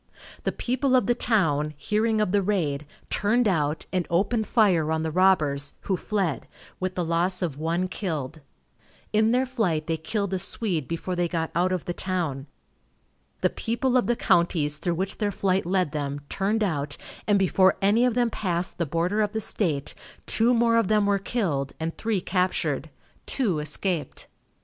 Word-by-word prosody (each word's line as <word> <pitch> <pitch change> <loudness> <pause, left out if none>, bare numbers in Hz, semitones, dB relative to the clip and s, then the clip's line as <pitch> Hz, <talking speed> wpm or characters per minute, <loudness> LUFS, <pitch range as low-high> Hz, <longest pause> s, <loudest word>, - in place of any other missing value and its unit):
The - - +2
people 260 +2 0
of 250 -5 +4
the 240 - +3
town, 155 -11 +1
hearing 215 +5 +1
of 210 - +1
the 205 0 +3
raid, 155 -8 -1 0.2
turned 225 +4 +2
out, 155 -5 0
and 180 -2 0
opened 210 +6 +1
fire 180 -9 +3
on 160 0 0
the 160 - -2
robbers, 150 -6 +2
who 190 - 0
fled, 190 -5 -2 0.3
with 185 0 -2
the 180 - -1
loss 175 +3 +2
of 150 -5 -3
one 170 +3 0
killed. 160 -6 -4 0.7
In 215 +1 +4
their 250 +3 +2
flight 200 -12 -1
they 165 0 -1
killed 200 +4 -2
a 190 - 0
Swede 180 - -1
before 170 +2 -3
they 175 0 +1
got 165 -1 -2
out 180 +2 +1
of 185 -2 -2
the 175 - -2
town. 165 -8 -2 0.9
The - - +2
people 245 +3 -1
of 250 - +3
the 240 - +2
counties 165 -8 +2
through 170 +2 -1
which 190 +3 -3
their 210 -2 +1
flight 190 -2 0
led 185 -4 +1
them, 145 -2 -3
turned 210 +3 0
out, 145 -6 -2 0.3
and 205 -1 +4
before 190 0 +3
any 205 +4 +3
of 250 -2 +2
them 240 -2 +2
passed 175 -5 -2
the 170 - 0
border 175 +8 0
of 210 0 0
the 220 - -1
state, 160 -9 -2 0.3
two 235 +2 +3
more 230 0 +3
of 230 - +2
them 210 0 +3
were 200 -1 +2
killed 170 - -1
and 160 +1 -3
three 220 -4 -1
captured. 185 0 -1 0.4
Two 205 - +1
escaped. 155 0 -3
185 Hz, 180 wpm, -25 LUFS, 160-215 Hz, 0.9 s, of